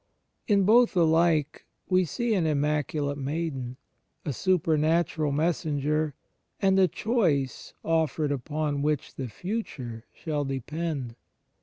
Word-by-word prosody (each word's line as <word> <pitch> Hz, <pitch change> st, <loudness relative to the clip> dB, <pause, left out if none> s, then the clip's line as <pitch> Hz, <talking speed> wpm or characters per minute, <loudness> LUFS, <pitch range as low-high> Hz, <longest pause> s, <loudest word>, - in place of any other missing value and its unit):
In 200 Hz, -2 st, +4 dB
both 225 Hz, +1 st, +5 dB
alike 160 Hz, -2 st, +2 dB, 0.2 s
we 185 Hz, -1 st, +3 dB
see 240 Hz, -, -1 dB
an 180 Hz, -6 st, +2 dB
Immaculate 145 Hz, -1 st, 0 dB
Maiden, 135 Hz, -3 st, -3 dB, 0.5 s
a 145 Hz, -, -1 dB
supernatural 160 Hz, -1 st, +1 dB
messenger, 150 Hz, -1 st, 0 dB, 0.4 s
and 195 Hz, -2 st, +3 dB
a 190 Hz, -, +6 dB
choice 165 Hz, -, 0 dB
offered 160 Hz, -2 st, +1 dB
upon 145 Hz, +1 st, -2 dB
which 150 Hz, -1 st, -1 dB
the 130 Hz, -, -5 dB
future 125 Hz, -, -5 dB
shall 150 Hz, -3 st, -3 dB
depend. 135 Hz, -1 st, -3 dB
155 Hz, 110 wpm, -27 LUFS, 145-170 Hz, 0.5 s, a